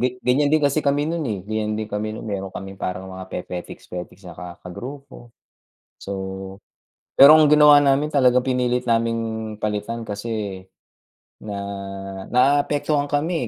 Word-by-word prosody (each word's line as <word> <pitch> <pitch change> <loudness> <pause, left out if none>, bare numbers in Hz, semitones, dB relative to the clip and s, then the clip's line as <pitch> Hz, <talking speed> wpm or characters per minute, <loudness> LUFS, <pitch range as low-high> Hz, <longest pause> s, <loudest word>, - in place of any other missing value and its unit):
gek 125 0 -1
ganyan 140 +4 +3
din 155 - +4
kasi 140 +2 +2
kami 145 0 +1
nun, 165 +1 -2
eh. 105 - -2
Ganyan 110 0 -2
din 110 - -2
kami 105 +1 -3
nun - - -8
meron 95 -2 -3
kaming 95 0 -9
parang 95 +1 -4
mga 95 0 -8
pepetiks-petiks 90 +1 -7
na 85 - -8
ka 90 +2 -8 0.2
kagrupo. 130 +6 -9 0.7
So 100 - -6 1.1
pero 150 +3 +10
ginawa 150 -1 +7
namin 140 +2 +2
talagang 125 -3 +4
pinilit 125 -1 0
naming 115 -2 -1
palitan 105 +2 -3
kasi 105 -2 -4 0.8
na 105 -1 -6 0.8
naapektuhan 145 +3 +2
kami, 150 -2 0
115 Hz, 140 wpm, -22 LUFS, 105-140 Hz, 1.1 s, pero